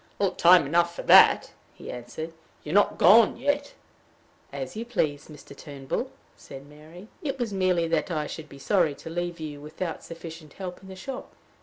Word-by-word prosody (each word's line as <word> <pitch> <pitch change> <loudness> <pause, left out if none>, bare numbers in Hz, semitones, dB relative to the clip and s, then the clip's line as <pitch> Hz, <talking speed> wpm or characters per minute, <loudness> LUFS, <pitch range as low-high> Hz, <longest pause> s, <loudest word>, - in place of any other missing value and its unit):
"Time 175 -2 +6
enough 170 +3 +1
for - - -6
that," - - +6 0.2
he - - -9
answered. 125 +7 -7 0.3
"You're 150 - -5
not 205 +1 +3
gone 215 +6 +6
yet." 285 +3 -1 0.8
"As - - -6
you 225 - -4
please, 155 -12 -2
Mr. 150 -2 -13
Turnbull," 140 -2 -5 0.3
said 135 +1 -12
Mary. 155 +6 -14
"It 280 -5 -3
was 235 -5 -3
merely 185 -3 +1
that 165 +2 0
I 155 -3 -2
should 155 0 -8
be 140 - -12
sorry 160 0 +1
to 165 - -10
leave 175 0 -4
you 150 -2 -7
without 160 +3 -6
sufficient 165 -2 -10
help 185 -2 -7
in 190 - -13
the 190 - -9
shop." 255 +8 -8
170 Hz, 175 wpm, -26 LUFS, 150-190 Hz, 0.8 s, Time